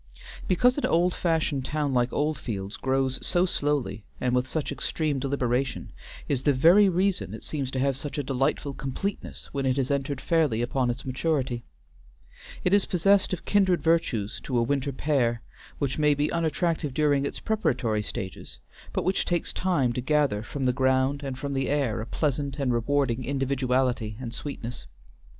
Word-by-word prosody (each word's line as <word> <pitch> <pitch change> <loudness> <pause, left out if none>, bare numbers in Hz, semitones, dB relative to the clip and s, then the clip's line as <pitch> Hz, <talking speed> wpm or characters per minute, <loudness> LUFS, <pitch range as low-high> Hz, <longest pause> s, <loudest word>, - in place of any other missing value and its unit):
Because 250 - +3
an - - 0
old 175 +2 +3
fashioned 160 -5 0
town 145 0 -1
like 125 0 +2
Oldfields 115 -10 -2
grows 130 0 -1
so 175 +1 +2
slowly 145 - -1 0.2
and 125 -1 0
with 125 +1 +1
such 155 0 -2
extreme 150 -4 -1
deliberation, 130 -1 -1 0.4
is 135 -3 0
the 145 +1 +3
very 175 +10 +6
reason 185 +2 0
it - - -9
seems 140 -4 -2
to 130 - -5
have 135 0 +1
such 145 +3 -6
a 145 - 0
delightful 135 +2 -1
completeness 135 +10 -5
when 135 -1 -1
it 130 +1 +1
has 135 0 0
entered 140 0 -1
fairly 150 -10 +1
upon 125 0 0
its 120 +1 -3
maturity. 130 -2 -1 1.0
It 180 - +2
is 205 -1 +5
possessed 195 +3 +3
of 185 - -4
kindred 190 -4 +3
virtues 160 -11 +1
to 125 - -1
a 120 - +3
winter 140 +2 0
pear, 125 -4 0 0.3
which 140 0 -2
may 150 -1 +4
be 145 +1 0
unattractive 165 -3 0
during 145 -2 +3
its 140 - -3
preparatory 130 - 0
stages, 95 -2 -6 0.4
but - - 0
which 190 +2 +2
takes 175 -1 -1
time 160 -10 +1
to 125 - -2
gather 140 -6 +1
from 135 +4 -4
the 125 - +3
ground 130 +2 +2
and 135 -2 -4
from 140 +1 -4
the 135 -1 0
air 140 -7 0
a 110 - -6
pleasant 140 -1 -1
and 135 -4 0
rewarding 130 0 +1
individuality 130 -4 0
and 120 -3 -6
sweetness. 125 -4 -6
140 Hz, 170 wpm, -27 LUFS, 125-155 Hz, 1.0 s, very